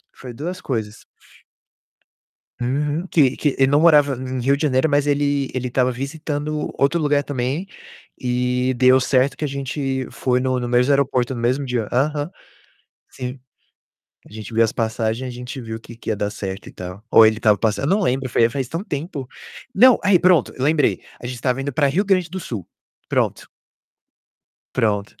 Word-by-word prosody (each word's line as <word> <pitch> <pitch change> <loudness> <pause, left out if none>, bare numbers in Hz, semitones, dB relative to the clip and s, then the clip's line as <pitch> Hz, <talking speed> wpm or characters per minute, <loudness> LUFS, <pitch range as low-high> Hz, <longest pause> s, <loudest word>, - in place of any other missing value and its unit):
Foi 125 -2 -9
2 175 +9 -5
coisas. 110 -5 -4 1.6
Uhum. 145 +7 -1
Que 140 -7 +3
que 145 -3 0
ele 135 - +5
não 145 - +4
morava 150 -4 +5
em 130 0 -4
Rio 135 +3 +3
de 145 - -5
Janeiro, 140 +1 +2
mas 145 0 +2
ele 145 -1 +1
ele 125 -1 -2
tava 125 0 +2
visitando 150 +3 -4
outro 140 +5 +2
lugar 145 -1 +2
também 135 +6 -2 0.5
e 125 +1 0
deu 130 +1 +5
certo 130 +1 +2
que - - -4
a 150 - 0
gente 135 -1 -3
foi 125 -1 0
no 130 0 0
no 120 - -3
mesmo 125 +3 +3
aeroporto, 130 -2 +1
no 120 - -5
mesmo 130 +4 0
dia. 125 -4 -2
Aham. 145 +5 0 0.8
Sim. 125 +1 -6 0.9
A - - -21
gente 110 0 -8
viu 115 - +3
as 110 -1 +2
passagem, 110 +2 -1
a 125 - -5
gente 125 +2 -7
viu 110 -1 -6
que 115 +1 -12
que 115 - -7
ia 110 - +1
dar 105 0 -2
certo 100 -2 -6
e - - -9
tal. 90 +2 -8
Ou 115 - +8
ele 110 0 +2
tava 105 -3 +4
passando 110 +4 0
eu 185 +7 +3
não 210 - -1
lembro, 130 -4 0
foi 115 - +2
há - - +2
faz 130 -1 -3
tão 165 +7 -4
tempo. 145 - -5 0.5
Não, 255 0 +7
aí 200 -3 +5
pronto, 175 -6 +3
lembrei. 150 +2 +2 0.2
A - - -9
gente 125 -1 -6
tava 130 0 0
indo 140 +1 -3
pra 140 +2 +2
Rio 175 +9 +1
Grande 185 -4 +1
do 190 +2 -5
Sul. 105 - -6 0.4
Pronto. - - -1 1.3
Pronto. 105 -2 -1
130 Hz, 190 wpm, -21 LUFS, 120-145 Hz, 1.6 s, Ou